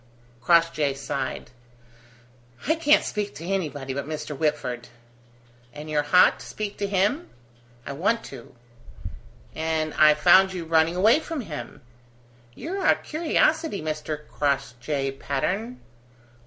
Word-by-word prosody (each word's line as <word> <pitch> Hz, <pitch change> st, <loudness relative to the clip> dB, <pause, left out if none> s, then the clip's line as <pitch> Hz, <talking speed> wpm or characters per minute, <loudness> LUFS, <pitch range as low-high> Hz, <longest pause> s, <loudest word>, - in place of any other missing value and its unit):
Crossjay 155 Hz, -1 st, +3 dB
sighed. 135 Hz, -2 st, -4 dB, 1.2 s
"I 315 Hz, -, +4 dB
can't 315 Hz, -2 st, +4 dB
speak 210 Hz, -1 st, -4 dB
to 165 Hz, -, -8 dB
anybody 150 Hz, -8 st, -3 dB
but 140 Hz, +1 st, -4 dB
Mr. 155 Hz, -1 st, -5 dB
Whitford." 135 Hz, -5 st, -2 dB, 0.9 s
"And 150 Hz, +1 st, -8 dB
you're 150 Hz, -1 st, +2 dB
hot 145 Hz, +5 st, +4 dB
to -, -, -10 dB
speak 210 Hz, -1 st, -5 dB
to 200 Hz, -, -1 dB
him?" 205 Hz, -, 0 dB, 0.6 s
"I -, -, -5 dB
want 200 Hz, +11 st, 0 dB
to." 125 Hz, -3 st, -11 dB, 1.0 s
"And 160 Hz, -1 st, -2 dB
I 150 Hz, 0 st, +6 dB
found 190 Hz, +4 st, +5 dB
you 175 Hz, -3 st, -5 dB
running 160 Hz, +1 st, +2 dB
away 215 Hz, +10 st, +5 dB
from 320 Hz, -2 st, -5 dB
him. 160 Hz, -, -8 dB, 0.7 s
You're 380 Hz, +4 st, -5 dB
a -, -, +5 dB
curiosity, 320 Hz, -, 0 dB
Mr. 155 Hz, -1 st, -5 dB
Crossjay 140 Hz, 0 st, -2 dB
Patterne." 200 Hz, -, -2 dB
160 Hz, 125 wpm, -25 LUFS, 145-200 Hz, 1.2 s, I